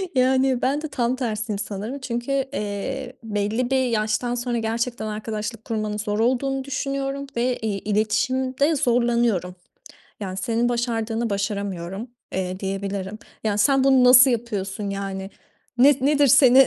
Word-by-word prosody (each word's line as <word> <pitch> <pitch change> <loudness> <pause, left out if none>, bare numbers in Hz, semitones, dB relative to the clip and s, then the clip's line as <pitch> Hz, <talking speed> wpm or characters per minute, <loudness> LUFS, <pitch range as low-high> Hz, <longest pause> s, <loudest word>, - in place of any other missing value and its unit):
Yani 260 0 +3
ben 280 +3 +1
de 310 - -3
tam 245 -3 0
tersiyim 220 -4 -3
sanırım, 210 +6 -5
çünkü, 240 0 -3 0.2
eee, 245 +5 -4
belli 215 +3 -1
bir 260 -1 +3
yaştan 225 +1 0
sonra 240 0 -2
gerçekten 230 0 -2
arkadaşlık 215 +1 -5
kurmanın 215 -2 -2
zor 210 0 -2
olduğunu 265 +3 +1
düşünüyorum 275 0 -3
ve, 245 +1 +1
iii, 205 -3 -1
iletişimde 255 +8 +1
zorlanıyorum. 235 - +1 0.6
Yani 190 -2 -5
senin 230 +4 0
başardığını 230 -1 -1
başaramıyorum, 200 0 -3 0.3
eee, 185 0 -2
diyebilirim. 195 +1 -4 0.2
Ya, 210 -2 0
sen 270 +5 +4
bunu 265 -2 +5
nasıl 250 +1 +8
yapıyorsun 205 -3 -3
yani? 195 -1 -4 0.5
Ne 275 +4 +7
nedir 285 +1 +4
seni? 260 -1 +7
235 Hz, 135 wpm, -23 LUFS, 210-260 Hz, 0.6 s, nasıl